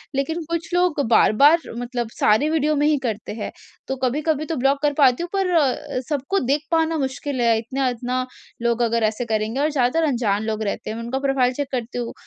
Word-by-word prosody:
लेकिन 320 +5 -1
कुछ 335 +1 -3
लोग 355 -4 +2
बार-बार 285 +9 +5 0.2
मतलब 240 -1 -3
सारे 220 +9 +3
वीडियो 305 -1 +1
में 295 0 +2
ही 300 -1 +3
करते 215 -3 -3
हैं। 215 - -5 0.4
तो 265 - -2
कभी-कभी 300 +4 0
तो 325 - -3
ब्लॉक 275 +2 +2
कर 290 -1 +2
पाती 275 +2 +3
हूँ 350 - -5
पर 385 -2 +1
अ, 280 -5 +1
सबको 295 +7 0
देख 280 +4 0
पाना 325 0 +2
मुश्किल 265 0 -3
है, 230 -1 +3
इतना-इतना 255 +1 -2 0.4
लोग 235 0 +1
अगर 230 -1 +1
ऐसे 215 +3 0
करेंगे 220 +3 -1
और 305 - +2
ज़्यादातर 290 +4 +1
अनजान 220 -6 0
लोग 220 0 -2
रहते 200 - -3
हैं। 220 - -4
मैं 230 - -5
उनका 260 +3 -2
प्रोफाइल 270 -2 +1
चेक 285 +1 -3
करती 245 -1 -4
हूँ 235 - -4
265 Hz, 205 wpm, -22 LUFS, 235-300 Hz, 0.4 s, बार-बार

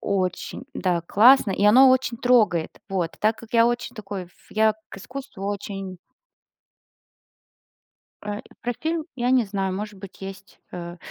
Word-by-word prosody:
Очень, 190 +5 -2
да, 175 -3 0
классно, 230 +6 +6
и 200 - 0
оно 255 +5 +8
очень 255 -2 +1
трогает. 215 -10 +3 0.2
Вот. 180 -4 -2
Так 215 +1 +2
как 230 - -13
я 230 -1 +5
очень 240 0 -2
такой, 195 -5 -6 0.2
я 220 0 +3
к - - -10
искусству 250 -1 -8
очень. 195 -2 -5 2.2
Э, 210 0 -4 0.2
про 245 - -1
фильм 320 0 -1
я 245 0 0
не 255 -2 +4
знаю, 195 -2 -2
может 210 +2 -5
быть 195 0 -12
есть, 195 0 -10
э. 175 -1 -7
210 Hz, 145 wpm, -24 LUFS, 190-240 Hz, 2.2 s, оно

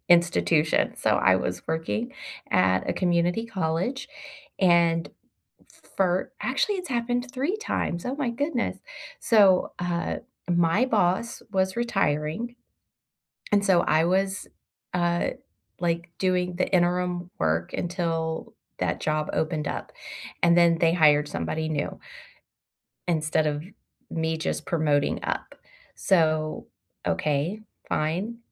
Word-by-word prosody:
institution, 170 -2 +3
so - - +1
I 95 - +4
was 90 -1 -3
working 120 -9 -2 0.4
at 95 0 +2
a - - +2
community 175 +5 +1
college, 190 - -2 0.5
and 170 -2 +3 0.9
for 185 -1 +1
actually, 415 -3 0
it's 360 -2 -6
happened 245 0 -1
3 280 +10 -1
times, 175 - -2
oh 260 +3 -2
my 270 -5 -1
goodness, 285 +7 -2 0.4
so, 200 -6 +4
uh, 175 -1 -1 0.3
my 175 +7 +3
boss 210 -1 +1
was 190 +2 +1
retiring, 200 0 -1 1.0
and 205 -1 +4
so 185 -3 +5
I 155 +1 +3
was, 190 +2 0 0.5
uh, 175 -1 +1 0.5
like, 170 0 -1
doing 180 -1 0
the 185 - 0
interim 180 0 +1
work 80 +1 0
until 165 -2 -2 0.2
that - - -1
job 155 0 0
opened 155 -2 -1
up, - - -5 0.5
and 170 0 +5
then 170 -1 +5
they 165 0 +3
hired 150 -3 +5
somebody 155 - -2
new 145 -2 -3 1.1
instead 155 -2 +1
of 150 0 -1 0.5
me 160 0 -1
just 160 - -3
promoting 150 -4 +1
up, - - -3 0.4
so, 155 -4 +1 0.4
okay, 150 +8 0 0.3
fine, 185 +10 -1
175 Hz, 115 wpm, -26 LUFS, 155-190 Hz, 1.1 s, so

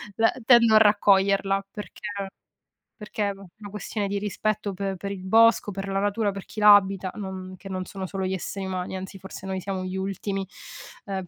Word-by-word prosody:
la 225 0 +4
uhm, 250 - -11
tendo 235 -3 +6
a - - +10
raccoglierla, 195 -2 +4
perché 210 - -9 1.0
perché 210 -1 -2
va 195 0 -13
è 195 - -11
una 205 -2 -9
questione 210 0 -3
di 200 +1 -2
rispetto 210 0 -2
pe 195 +1 -3
per 200 +2 -6
il 190 -2 -6
bosco, 225 0 +4
per 195 +1 -5
la 195 0 -1
natura, 205 +1 +1
per 195 -1 -7
chi 215 - -8
la 210 0 +10
abita, 190 -1 -1
non 190 -2 -6
che 195 - -10
non 185 -1 -3
sono 190 0 -6
solo 190 0 -4
gli 185 - -1
esseri 190 +1 -4
umani, 185 0 -4
anzi, 190 +1 -7
forse 190 0 -10
noi 190 -1 -3
siamo 190 0 -4
gli 185 +1 -4
ultimi; 195 0 -3 0.6
ehm, 190 -2 -3
195 Hz, 205 wpm, -25 LUFS, 190-205 Hz, 1.0 s, a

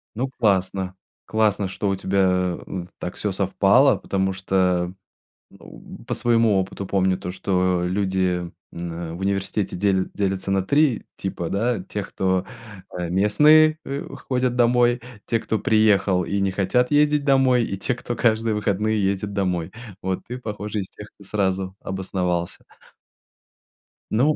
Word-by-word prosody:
Ну 130 +4 -2
классно. 95 -3 +1 0.3
Классно, 105 -3 +1
что 100 +2 -2
у 95 - +1
тебя, 95 -2 +1
э, 90 -2 -5
так 90 - -5
всё 105 - -2
совпало, 100 +7 +4
потому 95 -1 -1
что, 90 -1 0 0.6
э, - - -17 0.5
по - - -2
своему 115 -4 +3
опыту 95 +1 -5
помню 95 -1 +1
то, 90 -1 -5
что 90 -1 0
люди 90 -2 0 0.2
н 85 -1 -6
в - - -9
университете 100 +1 -1
дель 95 0 +1
делятся 95 -1 -1
на 95 -1 +2
3 140 +3 +2
типа, 85 -3 -4
да: 115 0 0
тех 100 +1 -6
кто, 95 -1 0 0.5
э, 90 -1 -3
местные, 150 - +5
э, 140 +1 -4 0.2
ходят 125 -1 +1
домой, 120 0 +3 0.3
те, 115 - 0
кто 110 - -1
приехал 105 -3 +3
и 100 - -2
не 95 -1 +1
хотят 115 +8 +1
ездить 150 0 +3
домой, 130 -3 +4
и 100 - -4
те, 125 +6 -1
кто 120 - -4
каждые 110 -2 +1
выходные 105 +1 0
ездит 100 +1 -1
домой. 90 -4 -1 0.3
Вот, 95 0 -2
ты, 125 +1 -5
похоже, 105 -3 -4
из 95 - -5
тех, 105 - -11
кто 100 - -16
сразу 95 -2 -1
обосновался. 90 -2 -2 1.5
Ну 140 +8 +3
100 Hz, 150 wpm, -23 LUFS, 95-115 Hz, 1.5 s, местные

